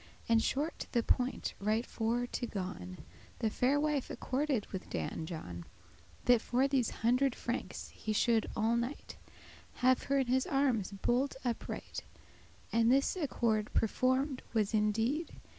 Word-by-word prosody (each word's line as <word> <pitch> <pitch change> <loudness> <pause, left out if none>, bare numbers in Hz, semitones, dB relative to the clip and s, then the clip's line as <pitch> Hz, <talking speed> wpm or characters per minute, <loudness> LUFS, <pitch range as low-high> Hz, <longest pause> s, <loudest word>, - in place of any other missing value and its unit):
And 230 -1 +4
shortly 290 +8 -1
to - - -27
the 235 -2 +3
point 250 +3 0
right 215 +4 +1
for 235 +2 -1
to 245 0 -3
gon, 180 - -5 0.4
The 220 - 0
faire 270 +6 +2
wife 295 -3 0
accorded 265 -4 -1
with 190 - -5
Dan 160 - -3
John, 90 - -6 0.6
That 245 -2 +6
for 255 +3 +2
these 265 -4 +2 0.2
hundred 255 +2 +3
francs 240 +2 -4
he 215 - -5
should 225 +1 +2
all 225 +1 +2
night 240 +4 -3 0.6
Have 255 0 +3
her 275 - +3
in 270 - +3
his 255 +1 +1
armes 260 -8 +1
bolt 245 +7 0
upright; 235 -2 -3 0.7
And 230 +1 +4
this 275 +6 +3
accord 235 - 0
performed 260 +4 +1
was 215 -1 +2
in 210 -1 +3
deed. 250 +10 -1
240 Hz, 150 wpm, -33 LUFS, 220-265 Hz, 0.7 s, That